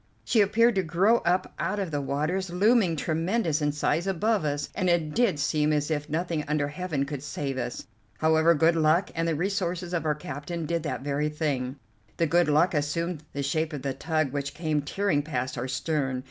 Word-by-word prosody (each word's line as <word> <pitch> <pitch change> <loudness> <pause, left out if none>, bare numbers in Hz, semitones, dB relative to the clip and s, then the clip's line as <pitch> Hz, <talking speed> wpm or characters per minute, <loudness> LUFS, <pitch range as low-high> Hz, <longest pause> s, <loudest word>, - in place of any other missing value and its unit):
She 225 - +4
appeared 230 +4 +4
to 195 - +2
grow 185 +7 +3
up 180 -2 0
out 185 +6 -1
of 190 -5 -2
the 145 -1 -1
waters; 155 +7 -1
looming 195 0 +3
tremendous 165 +2 0
in 150 0 +2
size 150 +4 0
above 195 0 +1
us, 145 0 -1
and 185 - 0
it 165 -3 +1
did 230 -9 +2
seem 150 +1 +1
as 150 +1 0
if 150 -1 -2
nothing 165 0 -1
under 145 -1 0
Heaven 150 -3 -2
could 145 -2 -5
save 140 -2 -4
us. 120 - -4 0.3
However, 160 +1 +4
good 165 +2 +4
luck 160 +4 +2
and 165 0 -1
the 165 - +1
resources 180 0 -2
of 170 -3 0
our 150 - +2
captain 150 +3 -5
did 170 +2 -1
that 150 -3 -3
very 145 +1 0
thing. 140 -4 -2 0.4
The 165 - +2
good 170 +1 +3
luck 155 +5 +3
assumed 155 +2 -1
the 140 - -2
shape 155 +3 -1
of 140 -2 -6
a 135 - 0
tug 155 0 -1
which 140 0 -3
came 155 -3 0
tearing 155 +1 0
past 130 -4 -3
our 125 +1 -3
stern. 135 -2 -1
155 Hz, 200 wpm, -27 LUFS, 145-175 Hz, 0.4 s, She